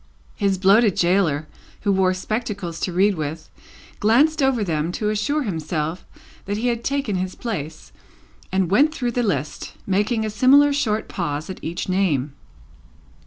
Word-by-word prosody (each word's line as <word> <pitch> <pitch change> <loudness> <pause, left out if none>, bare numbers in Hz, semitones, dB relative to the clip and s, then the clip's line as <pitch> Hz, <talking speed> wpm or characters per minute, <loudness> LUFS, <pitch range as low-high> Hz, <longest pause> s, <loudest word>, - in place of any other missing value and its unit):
His 200 -2 0
bloated 200 +2 +4
gaoler, 170 -4 +2 0.3
who 200 - +1
wore 190 -1 +2
spectacles 200 -4 -4
to 185 - -2
read 195 +4 +3
with, 155 -1 -5 0.5
glanced 285 +9 +3
over 265 -5 +2
them 165 -2 -1
to 210 +2 -1
assure 250 +9 0
himself 160 - -3 0.4
that 205 +1 -2
he 240 +3 0
had 235 -1 -2
taken 275 -8 -1
his 185 0 -3
place, 160 -10 -6 0.6
and 190 -2 0
went 295 +9 +4
through 245 -6 -1
the 245 - 0
list, 150 - -2
making 210 +4 0
a 215 - -3
similar 280 +6 +5
short 220 -7 0
pause 155 -1 -3
at 185 - -10
each 165 +2 -4
name. 160 -8 0
195 Hz, 155 wpm, -22 LUFS, 170-235 Hz, 0.6 s, similar